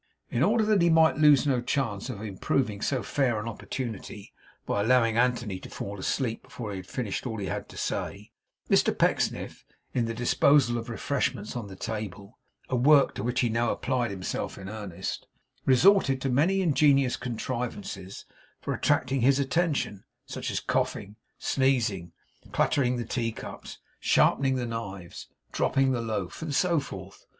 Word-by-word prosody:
In 120 Hz, -, 0 dB
order 215 Hz, +7 st, +3 dB
that 210 Hz, -3 st, +3 dB
he 170 Hz, -, +4 dB
might 160 Hz, -1 st, +5 dB
lose 150 Hz, -3 st, +6 dB
no 130 Hz, -4 st, +2 dB
chance 120 Hz, -4 st, -2 dB
of 110 Hz, -4 st, -6 dB
improving 105 Hz, +2 st, -1 dB
so 130 Hz, +1 st, 0 dB
fair 125 Hz, -6 st, 0 dB
an 105 Hz, -, -5 dB
opportunity 110 Hz, -3 st, -6 dB, 0.3 s
by 100 Hz, -, 0 dB
allowing 115 Hz, 0 st, +3 dB
Anthony 120 Hz, -5 st, +1 dB
to -, -, -10 dB
fall 100 Hz, 0 st, -6 dB
asleep 115 Hz, +4 st, -1 dB
before 110 Hz, -4 st, -7 dB
he 100 Hz, -, -4 dB
had 95 Hz, -1 st, -9 dB
finished 120 Hz, -1 st, -3 dB
all 110 Hz, -2 st, -4 dB
he 100 Hz, -, -3 dB
had -, -, -4 dB
to -, -, -12 dB
say, 100 Hz, +1 st, -4 dB, 0.4 s
Mr -, -, +3 dB
Pecksniff, -, -, 0 dB, 0.3 s
in 120 Hz, -2 st, +1 dB
the 115 Hz, 0 st, -3 dB
disposal 120 Hz, +1 st, +3 dB
of 115 Hz, -, -7 dB
the 120 Hz, -, -4 dB
refreshments 125 Hz, -4 st, -2 dB
on 115 Hz, -4 st, -4 dB
the 95 Hz, -, -9 dB
table, 105 Hz, +1 st, -6 dB, 0.3 s
a 130 Hz, -, -1 dB
work 140 Hz, +3 st, +5 dB
to -, -, -5 dB
which 125 Hz, +3 st, 0 dB
he 120 Hz, -, +2 dB
now 115 Hz, +1 st, +1 dB
applied 125 Hz, -2 st, -1 dB
himself 95 Hz, -2 st, -4 dB
in 95 Hz, -, -8 dB
earnest, 105 Hz, -5 st, -5 dB, 0.4 s
resorted 135 Hz, 0 st, +5 dB
to 135 Hz, -, -1 dB
many 170 Hz, +10 st, +3 dB
ingenious 140 Hz, -5 st, +3 dB
contrivances 115 Hz, -5 st, -5 dB, 0.3 s
for -, -, -3 dB
attracting 130 Hz, 0 st, +1 dB
his 135 Hz, +3 st, +4 dB
attention; 140 Hz, -, 0 dB, 0.2 s
such -, -, -5 dB
as -, -, -1 dB
coughing, 100 Hz, +2 st, -2 dB, 0.2 s
sneezing, 120 Hz, -10 st, 0 dB, 0.4 s
clattering 125 Hz, -3 st, +2 dB
the 120 Hz, -, -3 dB
teacups, 115 Hz, -1 st, -5 dB, 0.2 s
sharpening 135 Hz, -1 st, +3 dB
the 125 Hz, -1 st, -1 dB
knives, 100 Hz, -6 st, -6 dB, 0.2 s
dropping 135 Hz, -1 st, +2 dB
the 120 Hz, -2 st, 0 dB
loaf, 110 Hz, -, -4 dB
and 155 Hz, -3 st, -3 dB
so 170 Hz, -1 st, +3 dB
forth. 140 Hz, -, -9 dB
120 Hz, 165 wpm, -27 LUFS, 105-135 Hz, 0.4 s, lose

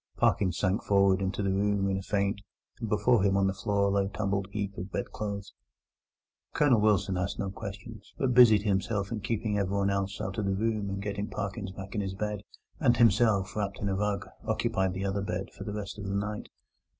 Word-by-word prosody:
Parkins 90 Hz, -4 st, +2 dB
sank 95 Hz, +1 st, +1 dB
forward 100 Hz, -1 st, +3 dB
into 95 Hz, +2 st, -1 dB
the 100 Hz, -, +1 dB
room 100 Hz, 0 st, +1 dB
in 95 Hz, -, +1 dB
a 95 Hz, -, -2 dB
faint, 100 Hz, +1 st, -1 dB, 0.4 s
and 115 Hz, -3 st, -4 dB
before 105 Hz, +2 st, +3 dB
him 100 Hz, 0 st, +3 dB
on 100 Hz, -, +3 dB
the 95 Hz, -, +1 dB
floor 100 Hz, 0 st, +1 dB
lay 100 Hz, 0 st, +2 dB
a -, -, -4 dB
tumbled 100 Hz, -1 st, -1 dB
heap 100 Hz, -1 st, -3 dB
of 90 Hz, +2 st, -6 dB
bed -, -, -3 dB
clothes. 100 Hz, -2 st, -5 dB, 1.0 s
Colonel 130 Hz, -7 st, +4 dB
Wilson 100 Hz, -3 st, +2 dB
asked 90 Hz, +1 st, -2 dB
no 100 Hz, -1 st, -2 dB
questions, 100 Hz, +2 st, -8 dB
but 130 Hz, -2 st, +1 dB
busied 115 Hz, -5 st, +7 dB
himself 100 Hz, 0 st, 0 dB
in 115 Hz, -, -2 dB
keeping 110 Hz, -1 st, -1 dB
everyone 100 Hz, 0 st, +1 dB
else 100 Hz, 0 st, -2 dB
out 95 Hz, +2 st, -3 dB
of 105 Hz, -, -1 dB
the 95 Hz, -1 st, +1 dB
room 110 Hz, -1 st, -1 dB
and 100 Hz, -, -2 dB
in -, -, -5 dB
getting 100 Hz, 0 st, -3 dB
Parkins 100 Hz, 0 st, -4 dB
back 95 Hz, 0 st, -8 dB
to 105 Hz, -, -2 dB
his 95 Hz, -1 st, -3 dB
bed; 105 Hz, 0 st, -3 dB, 0.4 s
and 120 Hz, -6 st, +3 dB
himself, 110 Hz, -4 st, +3 dB
wrapped 100 Hz, -2 st, -2 dB
in 100 Hz, -, -1 dB
a 95 Hz, -, 0 dB
rug, 100 Hz, 0 st, -1 dB, 0.2 s
occupied 95 Hz, -1 st, 0 dB
the 95 Hz, +1 st, -2 dB
other 100 Hz, +1 st, -1 dB
bed, 95 Hz, 0 st, -3 dB
for -, -, -8 dB
the 105 Hz, -, -4 dB
rest 105 Hz, 0 st, -5 dB
of 100 Hz, -, -6 dB
the 100 Hz, 0 st, -2 dB
night. 105 Hz, +1 st, -3 dB
100 Hz, 220 wpm, -29 LUFS, 95-105 Hz, 1.0 s, busied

